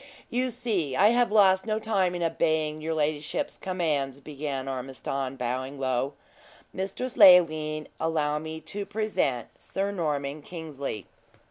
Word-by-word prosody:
"You 255 +2 +1
see 215 - -1
I 205 +7 +6
have 240 -1 +3
lost 190 -2 +5
no 215 0 +1
time 195 -5 +1
in 175 - -2
obeying 155 -2 0
your 160 +1 -2
ladyship's 150 -1 -1
commands," 150 -7 -1
began 140 -2 -5
Ormiston, 135 0 -4
bowing 130 +2 -3
low. 130 +1 0 0.6
"Mistress 195 +6 -3
Leoline, 155 -4 +6
allow 150 -2 0
me 160 +1 -6
to 200 +6 -4
present 200 - -1
Sir 195 +1 -2
Norman 150 -5 -2
Kingsley." 145 - -6
155 Hz, 130 wpm, -27 LUFS, 140-190 Hz, 0.6 s, I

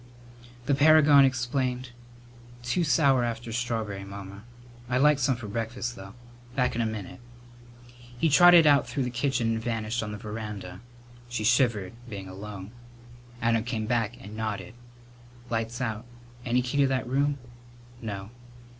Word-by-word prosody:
The 140 - +2
paragon 145 -1 +7
explained: 130 0 -1 0.7
"Too 125 +9 0
sour 140 -5 +3
after 115 0 -4
strawb'ry, 110 -4 -3
Mamma. 100 0 -9 0.5
I'd 125 - +1
like 150 -1 +5
some 130 0 +2
for 115 -3 -8
breakfast, 115 +3 -4
though. 95 -1 -11 0.4
Back 125 -1 +1
in 120 - -1
a 115 - +1
minute." 110 +1 -6 1.0
He 165 - +2
trotted 175 +2 +7
out 145 -2 +5
through 140 - -1
the 125 - -3
kitchen 125 -2 0
and 110 - -2
vanished 115 0 -2
on 105 -1 -4
the 105 - -5
veranda. 105 -3 -7 0.5
She 120 -3 -3
shivered, 115 -4 +2 0.2
being 100 -3 -7
alone. 100 +1 -8 0.7
Adam 115 -1 +2
came 115 -2 -3
back 115 -1 -1
and 105 +2 -10
nodded: 105 -4 -4 0.8
"Light's 115 +1 -2
out. 110 -3 -3 0.4
Any 125 +1 +2
key 125 +3 -3
to 140 - +5
that 130 -1 -1
room?" 140 +3 +1 0.6
"No." 100 -2 -6
120 Hz, 145 wpm, -27 LUFS, 110-130 Hz, 1.0 s, paragon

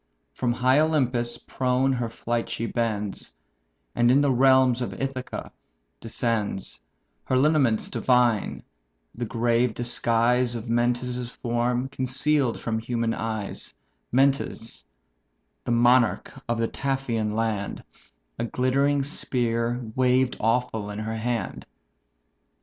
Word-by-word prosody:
From 125 -2 0
high 130 +3 +3
Olympus 125 -7 +1
prone 130 +2 0
her 120 -2 -2
flight 115 +1 -3
she 115 - -3
bends, 110 -4 -2 0.6
And 120 0 +3
in 130 +3 +5
the 145 -1 +3
realms 130 -1 +4
of 125 - -4
Ithaca 135 -1 -4 0.5
descends, 115 -4 -2 0.4
Her 130 - +1
lineaments 135 -6 +3
divine, 120 -4 +1 0.5
the 120 - -4
grave 115 +1 +1
disguise 120 +1 +1
Of 115 0 -6
Mentes' 120 +1 0
form 120 +1 -1
conceal'd 135 0 +1
from 110 -1 -2
human 115 0 -1
eyes 110 -3 -4 0.4
(Mentes, 135 -3 0 0.8
the - - -1
monarch 120 0 +3 0.2
of 120 - +1
the 115 0 +1
Taphian 120 -7 -2
land); 110 -3 -2 0.6
A - - 0
glittering 135 +4 +1
spear 120 -4 -1
waved 130 0 +2
awful 115 -2 0
in 105 - -6
her 110 +1 -3
hand. 115 +1 -3
120 Hz, 115 wpm, -25 LUFS, 115-130 Hz, 0.8 s, in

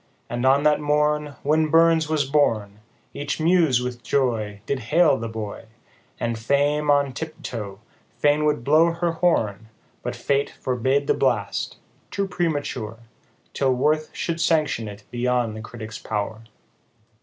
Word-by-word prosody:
87 - - -4
And 120 +1 -1
on 140 +2 +4
that 150 0 +4
morn, 150 0 +1
When 155 +2 +2
BURNS 165 -1 +4
was 155 -3 +1
born, 115 -8 +1 0.3
Each 145 - -3
Muse 160 -7 +3
with 125 -1 -5
joy, 110 -8 -1
Did 140 +1 -1
hail 155 +6 +3
the 115 - -4
boy; 110 -1 -6 0.5
And 115 -1 -2
fame 145 +5 +1
on 140 -2 +3
tip 160 +2 -7
toe, 105 -5 -5 0.4
fain 145 +4 +3
would 150 -5 +1
blow 160 +5 +4
her 170 0 0
horn, 110 - 0 0.3
But - - -4
Fate 140 0 0
forbade 130 +3 0
the - - +3
blast, 120 -7 -1 0.3
too 200 -1 -2
premature, 145 - -2 0.6
Till 130 -2 +1
worth 155 +4 +1
should 170 -1 -3
sanction 150 -9 +1
it 105 0 -9
beyond 120 -2 0
the 110 - -6
critic's 110 0 -8
pow'r. 110 +1 -3
140 Hz, 150 wpm, -23 LUFS, 115-155 Hz, 0.6 s, on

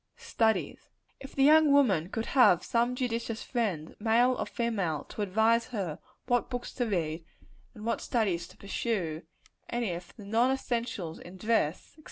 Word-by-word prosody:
Studies. 230 - -1 0.3
If 270 - -11
the 270 - +3
young 305 +1 +6
woman 200 - +3
could 225 +2 -3
have 185 -10 +5
some 240 +1 +1
judicious 230 -3 -2
friend, 195 - -2
male 230 +4 +4
or - - -3
female, 195 -10 -1
to - - -6
advise 220 +4 +2
her 195 -10 -4 0.3
what 245 -1 +1
books 245 -1 -5
to 245 -2 -1
read, 165 -5 -2 0.5
and 215 -1 -9
what 230 - -1
studies 190 -8 0
to - - -18
pursue 195 -6 -2 0.5
and 240 0 -1
if 175 -2 -5
the 210 - -11
non 230 +5 +2
essentials 235 -10 -2
in 180 +2 -11
dress, 185 -6 0
&c. - - -23
225 Hz, 165 wpm, -29 LUFS, 180-245 Hz, 0.5 s, young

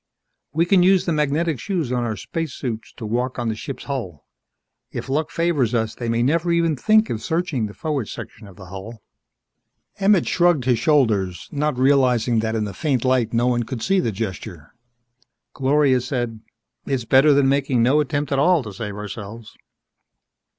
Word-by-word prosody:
_" - - -60 0.5
"We 160 +4 +1
can 185 0 +4
use 185 +1 +4
the 170 - 0
magnetic 150 0 0
shoes 170 - -2
on 125 -1 0
our 110 -2 -2
spacesuits 130 - -5
to 115 - -8
walk 125 +4 -2
on 120 -2 -1
the 110 - -2
ship's 135 +5 -7
hull. 115 - -5 0.7
If - - -6
luck 155 +3 0
favors 150 -9 0
us 110 -1 0
they 120 -2 -5
may 115 +1 +1
never 165 +6 +1
even 165 -2 +2
think 215 - +3
of 110 - -3
searching 160 -9 -1
the 105 - -11
forward 145 -8 -2
section 110 -2 -9
of 95 - -14
the 100 - -12
hull." 100 +5 -9 1.0
Emmett 195 -2 +3
shrugged 175 -7 +2
his 125 -3 +2
shoulders, 110 - +1
not 150 -2 -1
realizing 125 -3 +3
that 110 0 -1
in 110 - 0
the 100 -2 -5
faint 135 -6 -1
light 130 -3 +2
no 120 +1 +1
one 125 -1 +1
could 120 0 -5
see 195 0 +2
the 115 - 0
gesture. 95 -6 -6 0.8
Gloria 135 -1 +2
said, 120 -4 -3 0.5
"It's 130 -4 -1
better 135 +5 +5
than 140 -1 +3
making 135 -3 +2
no 135 +5 +4
attempt 145 0 -1
at 135 - +1
all 170 0 +3
to 105 -3 -8
save 105 0 -6
ourselves." 105 +2 -8
130 Hz, 185 wpm, -22 LUFS, 115-150 Hz, 1.0 s, better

